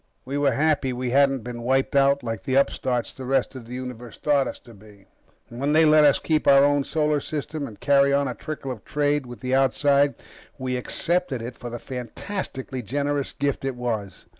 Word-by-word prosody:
We 135 +2 -4
were 145 -2 +2
happy 140 -1 +1
we 125 0 -3
hadn't 135 -2 +3
been 120 -1 -6
wiped 135 +3 +1
out 140 0 +4
like 115 -4 -4
the 130 +7 -2
upstarts 130 -3 +1
the 135 - -9
rest 135 +2 0
of 125 -4 -10
the 125 - -7
Universe 125 -2 -7
thought 140 -3 +2
us - - -6
to 120 - -15
be. 100 -1 -17 0.4
When 140 +5 -1
they 160 +1 +6
let 155 0 +6
us 145 - +5
keep 155 -2 0
our 140 0 +7
own 145 0 +3
solar 150 -2 +1
system 150 0 -4
and 105 - -12
carry 140 0 +4
on 140 0 +2
a 125 - -3
trickle 140 +1 -6
of 110 -5 -8
trade 145 -2 0
with 120 -1 -10
the 130 0 -2
outside, 140 +1 +3 0.4
we 130 -1 -2
accepted 165 +3 -1
it 120 +1 -6
for 120 - -7
the 120 - -5
fantastically 130 - -5
generous 140 +4 -1
gift 140 -1 -2
it 135 -1 -2
was. 115 -5 -4
135 Hz, 205 wpm, -24 LUFS, 125-145 Hz, 0.4 s, our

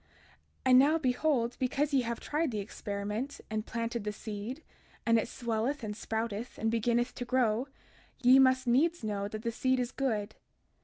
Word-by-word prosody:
32:33 - - -35 0.6
And 255 -1 +7
now, 295 +4 +5
behold, 255 -3 +1
because 275 +3 0
ye 270 - +4
have 235 -1 -3
tried 305 +1 -1
the 220 - -3
experiment, 210 +5 -4
and 215 0 -2
planted 230 -1 -3
the 210 - -2
seed, 215 +8 -6 0.4
and 230 0 +4
it 220 - -2
swelleth 240 +4 -2
and 210 -1 -3
sprouteth, 225 +1 -3
and 225 0 0
beginneth 235 +2 +1
to - - -5
grow, 245 -1 +1 0.6
ye 255 +2 +8
must 260 -1 +4
needs 290 +6 +2
know 205 -2 -2
that 215 +1 -6
the 230 - -1
seed 260 +2 +1
is 245 0 -1
good. 220 -6 -1
235 Hz, 175 wpm, -31 LUFS, 220-260 Hz, 0.6 s, ye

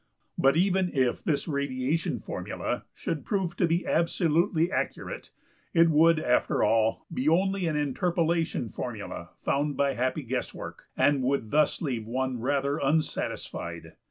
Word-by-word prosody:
But 135 +3 +3
even 185 0 +2
if 130 -2 +1
this 150 +1 0
radiation 140 +1 -1
formula - - -4
should - - -3
prove 190 -6 -1
to 175 - +3
be 170 +2 0
absolutely 170 +1 +2
accurate - - -3 0.5
it 165 0 +6
would 165 +2 +5
after 125 -5 +2
all 110 +1 +2
be 135 +4 +1
only 190 +2 +2
an 155 - 0
interpolation 165 -1 0
formula - - -6
found 145 0 0
by 140 -1 +2
happy 130 +4 -1
guesswork, 125 0 -5
and 145 -2 +3
would 130 -4 0
thus 150 +3 +2
leave 120 -7 -2
one 130 +1 -1
rather 140 +3 0
unsatisfied. 155 0 -2
150 Hz, 135 wpm, -28 LUFS, 130-170 Hz, 0.5 s, it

